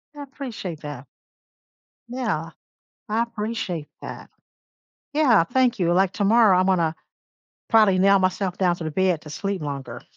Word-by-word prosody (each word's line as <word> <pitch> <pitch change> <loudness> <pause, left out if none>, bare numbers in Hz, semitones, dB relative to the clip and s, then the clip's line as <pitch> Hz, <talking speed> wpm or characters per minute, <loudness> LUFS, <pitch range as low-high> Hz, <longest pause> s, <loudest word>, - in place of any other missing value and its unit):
I 290 - -8
appreciate 245 - -7
that. 145 -3 -8 1.0
Yeah, 225 -11 -3 0.6
I 220 +2 +1
appreciate 215 -8 -4
that. - - -9 0.8
Yeah, 265 - +4
thank 245 +3 +1
you, 175 -1 +2
like 190 +1 +3
tomorrow, 210 -1 +4
I'm 185 +1 +2
gonna 170 -4 +1 0.7
probably 215 -4 +5
nail 195 +1 +5
myself 185 0 -1
down 180 -2 +2
to 170 - -7
the 155 - -3
bed 180 -1 +1
to 150 - -11
sleep 195 +3 -3
longer. 140 -2 -6
190 Hz, 140 wpm, -23 LUFS, 170-225 Hz, 1.0 s, probably